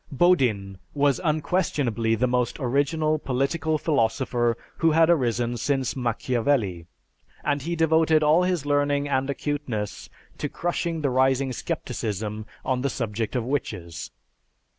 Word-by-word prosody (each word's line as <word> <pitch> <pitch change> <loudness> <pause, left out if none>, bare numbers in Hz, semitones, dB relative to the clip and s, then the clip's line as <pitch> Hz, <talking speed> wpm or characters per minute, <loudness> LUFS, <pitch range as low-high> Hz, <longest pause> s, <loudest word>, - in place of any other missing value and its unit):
Bodin 125 - +2 0.2
was 140 -2 +2
unquestionably 150 - 0
the 120 +3 +1
most 125 -1 0
original 150 +4 +1
political 145 +4 0
philosopher 120 -4 +1 0.2
who 165 - +3
had 160 +1 +5
arisen 120 -5 +1
since 135 +1 -1
Machiavelli, 115 -6 0 0.6
and 145 -1 0
he 170 +5 -2
devoted 160 -1 +3
all 155 +4 +5
his 180 -5 0
learning 145 0 +1
and 135 -1 0
acuteness 140 -8 -3 0.3
to 145 - -2
crushing 170 0 -2
the 140 -3 +1
rising 130 +1 +2
scepticism 105 -2 -4 0.2
on 130 -1 0
the 140 - 0
subject 115 -2 -3
of 125 - 0
witches. 105 - -4
135 Hz, 125 wpm, -25 LUFS, 115-150 Hz, 0.6 s, had